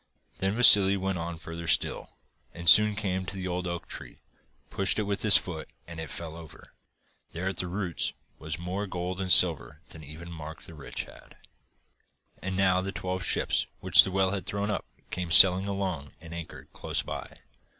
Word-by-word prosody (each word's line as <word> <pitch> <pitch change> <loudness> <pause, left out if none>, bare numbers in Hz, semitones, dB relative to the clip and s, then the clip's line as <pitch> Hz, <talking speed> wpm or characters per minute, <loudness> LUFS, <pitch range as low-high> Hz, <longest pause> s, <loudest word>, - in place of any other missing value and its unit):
Then 95 +2 -1
Vassili 100 -5 +7
went 95 -1 -3
on 85 0 -5
further 85 +1 -8
still, 80 - -1 0.4
and 85 0 -8
soon 105 +4 +7
came 95 -2 -2
to 100 - -5
the 95 -1 -5
old 90 0 -3
oak 85 0 -5
tree, - - -9 0.5
pushed 95 - 0
it 105 - 0
with 100 -1 -3
his 110 -2 +5
foot, 80 -3 -6 0.2
and 85 -1 -9
it 80 - -5
fell 80 -2 -7
over. 80 -2 -13 0.6
There, 90 +3 -4
at 95 - -3
the 90 - -3
roots, 90 -2 -3 0.3
was 80 -1 -5
more 95 +4 -4
gold 90 +1 -4
and 95 -1 -1
silver 80 -5 +4
than 80 - -11
even 80 +4 -11
Mark 80 -1 -9
the 85 - -12
Rich 75 -3 -6
had. - - -16 1.0
And 95 0 -4
now 95 -1 +2
the 95 +1 -4
twelve 95 0 -4
ships - - 0
which - - +7
the - - -3
whale 95 0 +1
had 100 -2 -5
thrown 100 +1 -2
up - - -3 0.3
came 90 -2 -4
sailing 90 +3 +7
along 95 -8 -4
and 80 0 -11
anchored 85 -1 -10
close - - -3
by. - - -8
90 Hz, 190 wpm, -27 LUFS, 85-95 Hz, 1.0 s, Vassili